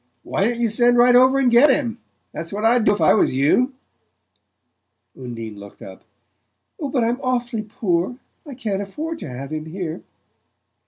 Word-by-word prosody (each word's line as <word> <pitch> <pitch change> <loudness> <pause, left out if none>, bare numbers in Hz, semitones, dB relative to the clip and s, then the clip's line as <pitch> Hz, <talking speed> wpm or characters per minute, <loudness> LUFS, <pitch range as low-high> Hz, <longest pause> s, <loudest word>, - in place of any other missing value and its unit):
Why 195 - -1
don't 235 0 -2
you 235 - +2
send 240 +2 +3
right 245 +1 +5
over 260 +2 +5
and 260 -3 +2
get 245 +5 +6
him? 245 -4 0 0.3
That's 165 +1 -7
what 210 +2 -3
I'd 235 0 +3
do 205 - +5
if 205 - -4
I - - +5
was 205 - +2
you." 245 - +2 1.4
Undine 115 -4 -8
looked 100 0 -13
up. 95 0 -12 0.8
"But 275 -5 -1
I'm 240 +3 -1
awfully 245 -3 -2
poor; 205 -1 -2 0.3
I 285 -5 -10
can't 210 -5 -3
afford 315 +12 -6
to - - -7
have 135 +3 -7
him 155 0 -4
here." 170 0 -5
230 Hz, 170 wpm, -21 LUFS, 170-250 Hz, 1.4 s, get